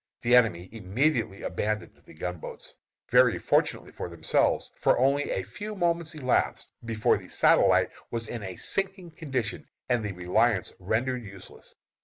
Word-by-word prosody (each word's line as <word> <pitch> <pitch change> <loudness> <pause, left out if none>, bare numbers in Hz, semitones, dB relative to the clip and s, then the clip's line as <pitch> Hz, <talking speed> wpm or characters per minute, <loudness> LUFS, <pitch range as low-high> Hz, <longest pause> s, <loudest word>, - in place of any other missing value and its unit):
The 120 +1 +5
enemy 100 -8 +3
immediately 115 +1 -1
abandoned 105 0 -2
the - - -16
gunboats 90 +1 -7 0.3
very - - +5
fortunately - - 0
for - - -6
themselves, 85 -2 +1
for - - +2
only 140 +3 +2
a 95 - -1
few 205 - -7
moments 170 -3 0
elapsed 130 -4 0
before 115 -2 +2
the - - -13
Satellite - - +4 0.2
was 115 -1 -3
in 120 - -5
a 95 -2 -6
sinking 195 -3 -2
condition, 130 -9 -4 0.2
and 120 -3 +1
the 105 -2 -3
Reliance 95 +4 +1
rendered 120 +6 -1
useless. 100 -3 -13
115 Hz, 145 wpm, -27 LUFS, 100-140 Hz, 0.3 s, The